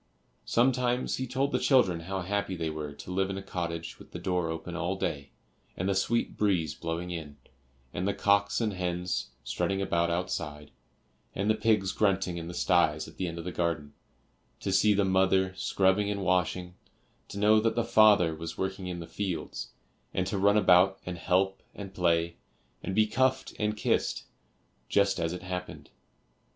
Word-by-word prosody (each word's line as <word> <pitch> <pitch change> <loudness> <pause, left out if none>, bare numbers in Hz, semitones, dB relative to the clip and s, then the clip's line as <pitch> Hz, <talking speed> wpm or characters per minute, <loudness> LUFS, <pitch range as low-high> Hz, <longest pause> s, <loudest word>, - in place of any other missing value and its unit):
Sometimes 125 0 +1
he 130 - -3
told 135 +3 0
the - - +1
children 125 - +3
how 95 +3 -4
happy 100 0 -2
they 80 -2 -2
were 75 -1 -5
to 70 +5 -9
live 95 +1 0
in 95 - -3
a 95 - -6
cottage 85 -3 -4
with - - -14
the - - -4
door 90 -1 -1
open 80 +2 -5
all 85 +3 -1
day, 70 -7 -3 0.5
and 90 - -1
the 100 - +2
sweet 115 +5 0
breeze 90 -8 +1
blowing 85 +2 -4
in, 75 -4 -6 0.6
and 90 +2 -2
the 100 - +1
cocks 100 0 +2
and 110 -3 0
hens 90 -5 -2
strutting 95 +10 -1
about 85 -3 +1
outside, 85 -4 -3 0.6
and 100 +3 +1
the - - +4
pigs 105 -3 +2
grunting 95 -4 +1
in 85 -1 -5
the 85 - -6
styes 80 -4 +2
at - - -14
the 95 - -2
end 85 0 -5
of 85 - -6
the 90 - -3
garden; 85 -4 -2 0.7
to 100 - -2
see 105 +2 +4
the 100 0 +2
mother 95 0 +3
scrubbing 95 +2 +1
and 100 -1 -2
washing, 90 -1 0 0.5
to 100 - -8
know 105 +1 +5
that 115 +1 +1
the 120 - +1
father 105 -7 +5
was 80 +1 -6
working 95 0 -3
in 90 -1 -4
the - - -6
fields, 95 -4 -4 0.5
and 95 - +1
to 95 +1 -2
run 100 +2 +4
about 95 -1 +5
and 90 -1 -5
help 95 +3 +1
and 100 -2 -8
play, 85 -2 +1 0.4
and 95 - -4
be 110 - +5
cuffed 130 +4 +1
and 105 0 0
kissed, - - 0 0.7
just 100 -2 +2
as 80 -1 0
it 90 +1 -6
happened. 90 0 -6
95 Hz, 185 wpm, -29 LUFS, 85-100 Hz, 0.7 s, know